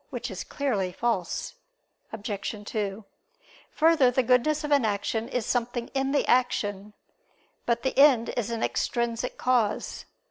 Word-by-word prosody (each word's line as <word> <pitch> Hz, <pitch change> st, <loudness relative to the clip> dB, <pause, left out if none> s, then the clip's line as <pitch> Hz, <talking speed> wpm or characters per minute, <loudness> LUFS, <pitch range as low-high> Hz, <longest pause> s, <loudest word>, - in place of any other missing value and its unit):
Which -, -, -5 dB
is -, -, -5 dB
clearly 215 Hz, -11 st, -2 dB
false. 195 Hz, -4 st, -2 dB, 0.6 s
Obj. 205 Hz, -1 st, -4 dB
2: 205 Hz, -1 st, -3 dB, 0.6 s
Further, 315 Hz, -5 st, +4 dB
the 250 Hz, +1 st, +1 dB
goodness 255 Hz, +6 st, +2 dB
of 295 Hz, -, -4 dB
an 285 Hz, -3 st, +4 dB
action 220 Hz, +2 st, -1 dB
is 245 Hz, -4 st, -2 dB
something 240 Hz, 0 st, -2 dB
in 270 Hz, 0 st, -1 dB
the 285 Hz, -, +2 dB
action. 210 Hz, -5 st, 0 dB, 0.7 s
But 235 Hz, -1 st, +1 dB
the 265 Hz, -, -1 dB
end 265 Hz, -5 st, +6 dB
is 235 Hz, -2 st, -2 dB
an 230 Hz, -1 st, -2 dB
extrinsic 235 Hz, +1 st, -1 dB
cause. 240 Hz, -5 st, 0 dB
235 Hz, 140 wpm, -27 LUFS, 215-260 Hz, 0.7 s, end